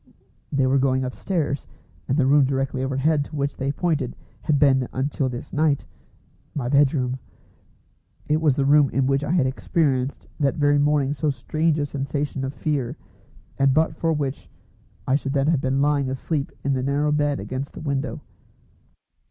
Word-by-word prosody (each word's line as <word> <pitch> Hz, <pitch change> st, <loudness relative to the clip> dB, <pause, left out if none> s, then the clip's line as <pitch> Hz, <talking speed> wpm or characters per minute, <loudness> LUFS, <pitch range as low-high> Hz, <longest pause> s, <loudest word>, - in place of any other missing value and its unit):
They 135 Hz, -2 st, +2 dB
were 135 Hz, +1 st, +3 dB
going 130 Hz, -1 st, +1 dB
upstairs, 145 Hz, +1 st, -2 dB, 0.4 s
and 135 Hz, -, +1 dB
the 140 Hz, -, +3 dB
room 140 Hz, +1 st, +5 dB
directly 135 Hz, -1 st, -1 dB
overhead 140 Hz, +3 st, +1 dB
to 150 Hz, -, -10 dB
which 140 Hz, -1 st, -1 dB
they 135 Hz, +1 st, -1 dB
pointed 150 Hz, -5 st, -1 dB, 0.3 s
had 145 Hz, +5 st, +1 dB
been 135 Hz, -3 st, +4 dB
until 135 Hz, 0 st, -1 dB
this 120 Hz, -1 st, -7 dB
night 150 Hz, -1 st, +1 dB, 0.7 s
my 135 Hz, -5 st, -2 dB
bedroom. 135 Hz, -2 st, +2 dB, 1.1 s
It 155 Hz, +1 st, +1 dB
was 150 Hz, -5 st, +3 dB
the 135 Hz, -, +1 dB
room 145 Hz, 0 st, +5 dB
in 135 Hz, 0 st, +1 dB
which 135 Hz, +1 st, +1 dB
I 145 Hz, -, -3 dB
had 165 Hz, -7 st, +3 dB
experienced 135 Hz, -1 st, 0 dB
that 140 Hz, 0 st, +2 dB
very 145 Hz, -2 st, +3 dB
morning 145 Hz, -1 st, +2 dB
so 150 Hz, +1 st, -1 dB
strange 155 Hz, +5 st, 0 dB
a 145 Hz, -, 0 dB
sensation 140 Hz, 0 st, -3 dB
of 135 Hz, -, -2 dB
fear, 135 Hz, -3 st, -2 dB, 0.6 s
and 135 Hz, -1 st, +4 dB
but 160 Hz, 0 st, +2 dB
for 165 Hz, +1 st, 0 dB
which 145 Hz, -3 st, -3 dB, 0.6 s
I 130 Hz, -, +1 dB
should 140 Hz, -1 st, 0 dB
then 140 Hz, -1 st, +2 dB
have 155 Hz, -3 st, +2 dB
been 135 Hz, +1 st, +1 dB
lying 145 Hz, -2 st, +1 dB
asleep 140 Hz, +2 st, -2 dB
in 140 Hz, -, +1 dB
the 130 Hz, -, 0 dB
narrow 140 Hz, +3 st, +1 dB
bed 145 Hz, -1 st, +1 dB
against 130 Hz, +8 st, -5 dB
the -, -, -7 dB
window. 140 Hz, -2 st, -2 dB
140 Hz, 175 wpm, -23 LUFS, 135-150 Hz, 1.1 s, room